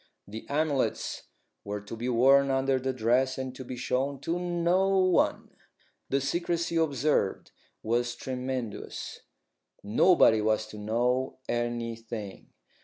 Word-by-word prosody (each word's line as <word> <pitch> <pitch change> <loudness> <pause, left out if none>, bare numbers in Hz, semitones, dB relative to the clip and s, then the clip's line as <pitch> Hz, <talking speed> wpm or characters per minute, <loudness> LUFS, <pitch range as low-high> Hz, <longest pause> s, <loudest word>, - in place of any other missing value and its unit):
The 110 +3 -8
amulets 145 -2 -1 0.4
were 105 0 -4
to 105 +2 -8
be 120 +3 -3
worn 135 +3 +5
under 135 0 +1
the 130 +1 -1
dress, 130 +2 +1
and 130 -1 -4
to 130 - -7
be 125 0 -7
shown 135 +3 -1
to 170 +2 -1
no 175 +2 +1
one. 185 -1 +2 0.6
The 135 - +2
secrecy 170 +4 -1
observed 145 -9 +1 0.3
was 120 +2 0
tremendous. 130 -3 -5 0.6
Nobody 110 - +5
was 110 0 +1
to 105 - -9
know 120 +5 0
anything. 115 -3 -4
130 Hz, 120 wpm, -28 LUFS, 115-140 Hz, 0.6 s, worn